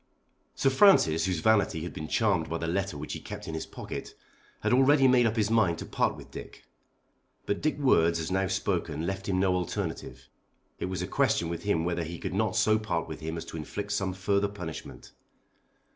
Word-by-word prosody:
Sir 135 - +2
Francis, 90 - +5
whose 90 -4 -1
vanity 105 -7 +2
had 85 - -6
been 80 - -6
charmed 95 -4 +1
by 85 - -1
the 85 - -4
letter 95 -1 -1
which 75 +1 -5
he - - -5
kept - - -8
in 80 - -5
his 80 - -4
pocket, - - -7 0.5
had 110 +2 +1
already 135 +1 +5
made 125 -2 +5
up 110 - -1
his 110 -1 +1
mind 100 -7 +3
to - - -6
part - - 0
with - - -13
Dick. - - -10 0.8
But 100 - -1
Dick's 155 -1 0
words 85 - +3
as 80 +2 -4
now 95 +1 +1
spoken 85 -5 -1
left 95 +2 -3
him 95 -1 +1
no 95 -1 +3
alternative. 90 -2 -4 0.5
It - - -2
was 95 0 -3
a - - -4
question 85 - +1
with 85 +3 -5
him 85 -5 +1
whether 85 0 -1
he 85 +2 -6
could - - -5
not 110 +1 0
so 110 0 +3
part 95 -6 -2
with 80 - -7
him 80 +1 -4
as 80 - -6
to - - -7
inflict 100 +6 -5
some 95 -3 -1
further 100 +2 +1
punishment. 90 -6 -8
95 Hz, 210 wpm, -28 LUFS, 85-110 Hz, 0.8 s, Francis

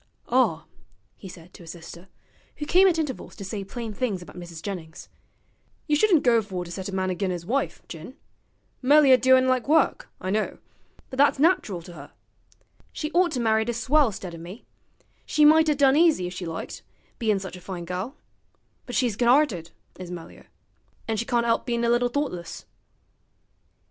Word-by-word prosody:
'Ah,' - - +2 0.5
he 190 - -11
said 175 0 -13
to - - -14
his 165 - -12
sister, 170 +2 -10 0.5
who 295 - -5
came 370 +5 +5
at 345 -3 +2
intervals 295 -6 -4
to 200 - -8
say 200 +1 -4
plain 225 +2 -6
things 205 -6 -2
about 155 - -14
Mrs. 175 -2 -9
Jennings, 170 -5 -7 0.8
'you 300 - +2
shouldn't 345 -1 +4
go 235 -2 +4
for 185 -4 -5
to 170 - -10
set 190 +2 -5
a - - -6
man 190 -1 -1
agin 185 +1 -2
'is 175 -2 -4
wife, 265 +8 -2
Jin. 170 +10 -9 0.7
Melier 280 0 +6
do'n' 260 +1 +4
like 255 -1 +1
work, 310 0 +2
I 185 - -3
know, 215 +1 -1 0.5
but 260 - -7
that's 285 +1 +4
nach'ral 280 - +1
to 175 0 -12
'er. 140 -2 -11 0.8
She 305 0 -4
ought 355 +1 +3
to 255 - -1
married 220 0 +1
a - - 0
swell 265 +1 +2
'stead 185 -3 -7
o' 165 - -9
me; 175 +7 -10 0.6
she 300 - +3
might 315 +1 +6
'a' 300 - +3
done 275 -1 +4
easy 315 - +4
if 180 - -5
she 180 -1 -6
liked, 165 0 -6 0.4
bein' 220 -4 +1
sich 190 -1 -7
a - - -13
fine 175 -2 -6
gal; 185 - -5 0.7
but 245 - -5
she's 240 -5 +1
good 240 +2 +1
'arted, 240 - +3 0.3
is 180 -1 -7
Melier; 175 -2 -10 0.6
an' 225 -1 -1
she 235 - -2
can't 235 -1 +1
'elp 230 -1 +1
bein' 235 -1 -1
a 235 +1 +3
bit 245 0 0
thoughtless.' 180 - -4
225 Hz, 190 wpm, -25 LUFS, 180-270 Hz, 0.8 s, Melier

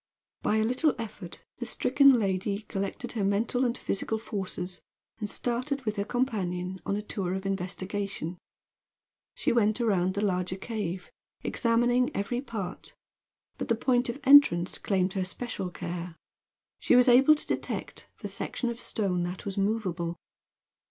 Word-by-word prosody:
By 210 - +1
a 220 - +3
little 255 +6 +2
effort 205 -6 -7 0.2
the 240 - -4
stricken 275 +1 +5
lady 200 +1 -1
collected 200 +4 -3
her 220 -4 -2
mental 215 +6 +1
and 245 -1 +1
physical 210 +3 -1
forces, 190 -4 -5 0.4
and 210 -2 -3
started, 250 +5 -2
with 215 -1 -1
her 200 - +1
companion, 190 -7 -2
on 200 - +1
a 210 - -3
tour 190 -3 -2
of 190 0 -5
investigation. 190 -2 -3 1.0
She - - +1
went 215 -1 +3
around 190 -5 +2
the 205 - 0
larger 180 -1 0
cave, 190 -3 -4 0.3
examining 240 +1 +2
every 240 +5 -1
part; 220 -9 -6 0.6
but - - -3
the 230 - +3
point 245 +1 +2
of 240 +4 -4
entrance 265 -11 +6
claimed 190 -2 +1
her 190 - 0
special 190 0 -4
care. 175 -1 -5 0.6
She - - +4
was 250 +1 +6
able 265 +5 +7
to 300 - -7
detect - - -4
the - - -3
section 245 - -3
of 235 - -7
stone 190 -7 -1
that 180 +1 -6
was 195 -2 -3
movable. 185 -5 -1
205 Hz, 150 wpm, -28 LUFS, 185-240 Hz, 1.0 s, able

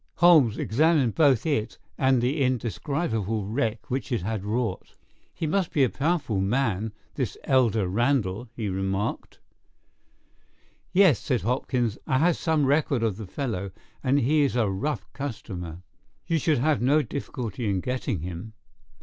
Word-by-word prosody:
Holmes 155 -11 +5
examined 145 0 +2
both 140 -8 +3
it 120 -8 -1 0.2
and 130 -2 +2
the 140 +4 0
indescribable 115 - -1
wreck 110 +1 -2
which 135 +2 -2
it 115 -8 0
had 105 -1 -3
wrought. 115 +3 -3 0.4
"He 165 - -4
must 180 +3 0
be 145 - +3
a 125 - +2
powerful 145 - 0
man, 110 -1 0 0.2
this - - -3
elder 115 -7 +2
Randall," 120 0 0
he 110 -3 -3
remarked. 95 +1 -2 1.5
"Yes," 185 - +5
said 125 -5 -1
Hopkins. 125 -2 -1
"I 135 -4 +2
have 165 +4 +3
some 160 -3 +1
record 140 -3 +2
of 110 -4 0
the 110 -3 -7
fellow, 100 -5 -3 0.3
and 140 +1 +3
he 150 +4 +3
is 140 -4 +1
a 115 -4 +2
rough 145 +11 -2
customer." 90 - -6 0.4
"You 165 -1 +1
should 155 +1 +2
have 145 +2 +1
no 145 +5 +3
difficulty 120 -4 -4
in 95 -2 +1
getting 125 - -2
him." 90 +5 -6
125 Hz, 150 wpm, -26 LUFS, 105-145 Hz, 1.5 s, Holmes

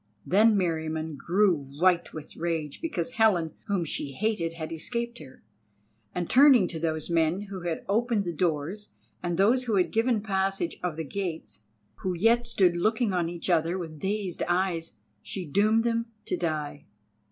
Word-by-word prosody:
Then 210 +3 +5
Meriamun 160 -3 -1
grew 185 +5 +2 0.2
white 180 -1 +3
with 155 -1 -9
rage 160 -3 -3
because 320 -6 -2
Helen 195 -9 +2
whom 195 -4 0
she 145 -2 -4
hated 185 -2 -1
had 160 -1 -6
escaped 235 +8 -4
her, 130 -3 -13 0.7
and 175 -1 -1
turning 260 -7 +6
to 160 - -5
those 160 0 -2
men 165 +3 +2
who 190 -2 -5
had 170 -2 -3
opened 220 0 +1
the 175 - -2
doors 170 +5 -2 0.3
and 175 -1 -2
those 235 +7 +3
who 225 -4 0
had 185 -2 +2
given 225 -1 +2
passage 195 -3 -1
of 180 -3 -2
the 160 - -2
gates, 160 - -5 0.3
who 185 -1 -2
yet 230 +6 +3
stood 185 -6 +3
looking 215 +4 +1
on 175 -2 0
each 170 -1 -5
other 170 0 +2
with 160 -4 -7
dazed 195 0 -2
eyes, 175 -2 0 0.3
she 185 -3 -5
doomed 210 +8 +3
them 230 0 0 0.2
to - - -1
die. 150 -4 -3
180 Hz, 165 wpm, -27 LUFS, 165-215 Hz, 0.7 s, turning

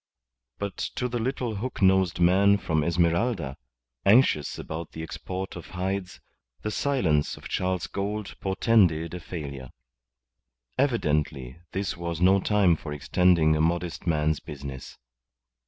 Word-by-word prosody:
But 100 -2 -4 0.2
to 125 - -1
the 120 -1 -3
little 120 -2 -2
hook 125 +6 -4
nosed 95 -2 +3
man 95 +3 +5
from 80 -5 0
Esmeralda, 85 - +1 0.5
anxious 100 - +4
about 80 +1 -6
the 80 - -6
export 95 +3 -5
of 85 - -8
hides, 95 0 -3 0.4
the 105 - -2
silence 95 - +1
of - - -9
Charles 90 -1 -1
Gould 100 +1 -4
portended 95 -5 +2
a 90 - -4
failure. 70 -7 -7 1.1
Evidently 75 - 0
this 95 +1 -2
was 85 -1 -4
no 95 +2 +5
time 100 -4 +3
for 75 -1 -8
extending 80 +1 +3
a 75 - +1
modest 85 +2 -1
man's 75 -1 +1
business. 70 -2 -8
90 Hz, 130 wpm, -26 LUFS, 80-100 Hz, 1.1 s, man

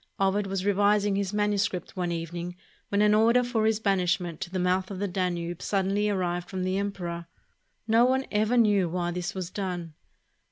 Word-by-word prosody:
Ovid 195 +1 +1
was 195 -1 -2
revising 205 0 +3
his 195 -1 -1
manuscript 205 -4 -1
one 180 -2 -1
evening 170 +1 -4 0.3
when 205 +1 +2
an 210 0 +5
order 230 +3 +4
for 230 -3 +1
his 220 -1 +1
banish 190 -4 +2
ment 170 -3 -7
to - - -4
the 185 - -3
mouth 185 +1 +1
of 195 - -5
the 200 +2 -1
Danube 175 -2 -2
suddenly 200 +1 0
arrived 175 -3 -1
from 185 -1 -3
the 185 +1 0
emperor. 175 -4 -4 0.6
No 230 +2 +5
one 260 +1 +1
ever 215 +4 +2
knew 205 -6 +4
why 175 0 -1
this 180 +3 -4
was 185 -2 -4
done. 180 -5 -4
195 Hz, 190 wpm, -27 LUFS, 180-205 Hz, 0.6 s, an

